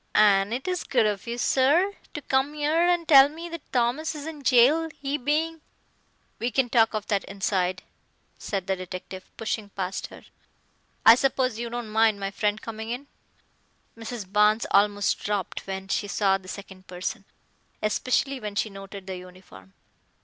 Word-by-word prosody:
"An' 200 -1 +5
it 255 +6 -3
is 365 -2 -1
good 245 -5 +2
of 205 +1 -2
you, 235 +1 -3
sir, 295 +11 +3 0.2
to 295 - -5
come 265 +3 0
'ere 310 +3 +2
and 345 -2 +1
tell 275 -2 +8
me 330 +3 -8
that 335 -2 -9
Thomas 255 +6 0
is 295 -1 -7
in 315 -2 -7
jail, 275 +6 +4
he 280 0 -2
being 310 +4 -1 0.4
" - - -41
"We 240 - 0
can 245 0 0
talk 225 -2 +4
of 215 -1 -3
that 200 -2 +1
inside," 190 -2 -1 0.6
said 195 -3 -3
the 190 - 0
detective, 185 +1 -8
pushing 220 -2 -3
past 190 -1 -4
her. - - -14 0.8
"I 225 - +11
suppose 255 -2 +1
you 235 0 -3
don't 235 -2 -5
mind 220 -1 +3
my 195 0 -3
friend 210 +1 -1
coming 220 0 -7
in." 250 +4 -4 0.9
Mrs. 225 -1 -6
Barnes 210 +2 +4
almost 205 0 +3
dropped 205 -3 -3
when 190 0 -5
she 205 +1 -1
saw 195 -1 +2
the 185 - -16
second 190 -1 -10
person, 180 0 -5 0.6
especially 255 +5 0
when 210 -3 -6
she 215 +1 -1
noted 195 0 -9
the 190 -1 -5
uniform. 180 - -14
220 Hz, 170 wpm, -26 LUFS, 195-270 Hz, 0.9 s, I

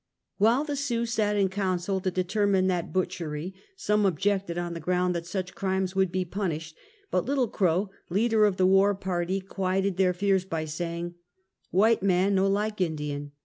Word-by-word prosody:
While 230 +7 +4
the 295 -2 -3
Sioux 245 -4 -1
sat 215 -3 0
in 200 -2 +3
council 190 -1 -1
to 185 - 0
determine 185 +1 +1
that 180 -2 -1
butchery, 180 -2 -3 0.2
some 210 - +1
objected, 195 0 0
on 175 -1 -3
the 165 - -5
ground 180 +2 +1
that 170 -1 -4
such 185 0 -4
crimes 190 -1 -1
would 190 -2 +2
be 185 0 -1
punished, 165 -4 -4 0.4
but - - +1
Little 270 -3 +1
Crow, 190 -1 0 0.2
leader 215 +3 +3
of 200 -3 +1
the 185 - +3
war 195 +2 +4
party, 185 0 -2
quieted 190 0 -1
their 185 -1 +3
fears 195 0 +2
by 165 -4 -3
saying: 170 +2 -4 0.6
"White 220 +5 +3
man 190 +1 +2
no 195 0 +3
like 210 +1 -1
Indian! 150 -4 -3
190 Hz, 175 wpm, -27 LUFS, 175-200 Hz, 0.6 s, While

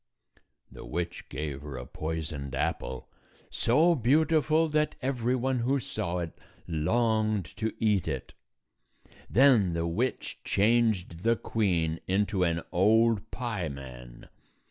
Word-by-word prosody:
The - - -10
witch 85 0 -4
gave 75 -3 -4
her 70 -3 -7
a 60 - -6
poisoned 75 -3 -4
apple, 65 -1 -2 0.4
so 155 +9 +3
beautiful 155 +4 +3
that 150 0 +1
every 125 -2 0
one 130 0 0
who 130 +4 +1
saw 90 -7 -3
it 85 -2 -4 0.3
longed 110 +4 +1
to 110 -1 -1
eat 105 -6 +1
it. 70 -4 -4 1.0
Then 115 -8 +5
the 85 0 -1
witch 110 +10 -2
changed 105 -5 +1
the 115 +3 +3
queen 85 -9 0
into 100 0 +1
an 85 -1 0
old 110 +4 +3
pieman. 70 - -6
100 Hz, 120 wpm, -28 LUFS, 80-120 Hz, 1.0 s, Then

